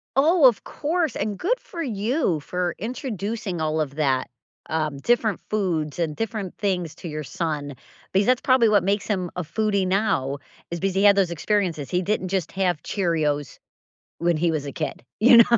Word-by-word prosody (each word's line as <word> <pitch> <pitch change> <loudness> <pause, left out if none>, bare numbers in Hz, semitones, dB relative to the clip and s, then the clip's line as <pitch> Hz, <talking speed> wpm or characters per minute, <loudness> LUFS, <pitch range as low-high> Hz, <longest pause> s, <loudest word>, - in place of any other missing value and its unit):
Oh, 310 +3 +5
of 240 -5 +5
course, 320 -2 -1
and 205 -1 -2
good 485 +8 +1
for 340 - -7
you 220 - 0
for 180 +2 -2
introducing 220 - -4
all 155 0 0
of 145 -3 -2
that, 135 -4 +1 0.4
um, 155 -3 -1
different 220 +4 +1
foods 175 -8 -1
and 160 -3 -1
different 215 -4 -3
things 180 -6 -1
to - - -8
your 155 -1 -4
son 145 -2 -3 0.4
because 195 +2 +3
that's 255 0 +3
probably 255 -3 +4
what 205 -4 +4
makes 200 +2 0
him 185 -5 -1
a 180 - -1
foodie 200 +2 0
now 185 -9 +1 0.3
is 170 - -4
because 195 -1 0
he 195 - +2
had 200 -1 +7
those 190 -3 +2
experiences; 170 -4 -1
he 180 - +1
didn't 190 0 -1
just 185 -3 -1
have 180 -5 0
Cheerios 155 - -1 0.6
when 170 -1 +2
he 170 +1 +2
was 155 -3 -2
a 140 - -4
kid, - - -4 0.2
you 235 +3 +8
know. 235 +1 +7
190 Hz, 185 wpm, -24 LUFS, 160-220 Hz, 0.6 s, you